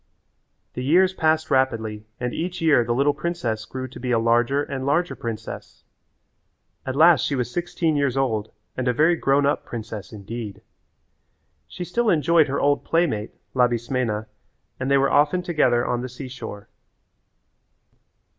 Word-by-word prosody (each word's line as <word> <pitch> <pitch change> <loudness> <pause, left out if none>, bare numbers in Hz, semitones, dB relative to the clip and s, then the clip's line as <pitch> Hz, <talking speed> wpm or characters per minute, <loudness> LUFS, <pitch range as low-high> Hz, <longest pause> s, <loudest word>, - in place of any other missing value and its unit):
The 125 - -4
years 185 +7 +4
passed 160 -2 +1
rapidly 110 -5 0
and 125 0 -2
each 175 +2 -3
year 155 -7 +4
the 120 - -3
little 140 +3 +3
princess 145 -9 -3
grew 130 +2 -6
to - - -11
be 125 - -4
a 120 - +3
larger 120 +5 +2
and 135 -2 -5
larger 165 +6 +1
princess. 115 -1 -7 1.0
At 130 - -2
last 160 -3 +6
she 140 - 0
was 125 -2 -2
sixteen 170 -1 -1
years 140 -3 0
old 110 -6 -1 0.2
and 130 -1 -2
a 125 - +3
very 155 +7 +4
grown 140 -2 +2
up 145 - +1
princess 110 -3 -7
indeed. 105 0 -7 1.0
She 180 - -7
still 230 +6 0
enjoyed 165 -1 +4
her 140 - -1
old 145 0 +2
playmate, 155 -11 0 0.2
Labismena, 120 -3 0 0.5
and 130 - -2
they 140 - +5
were 135 0 +2
often 150 +5 +3
together 150 -9 +2
on 120 0 -1
the 130 - -5
seashore. 125 -5 -8
130 Hz, 155 wpm, -23 LUFS, 120-155 Hz, 1.0 s, last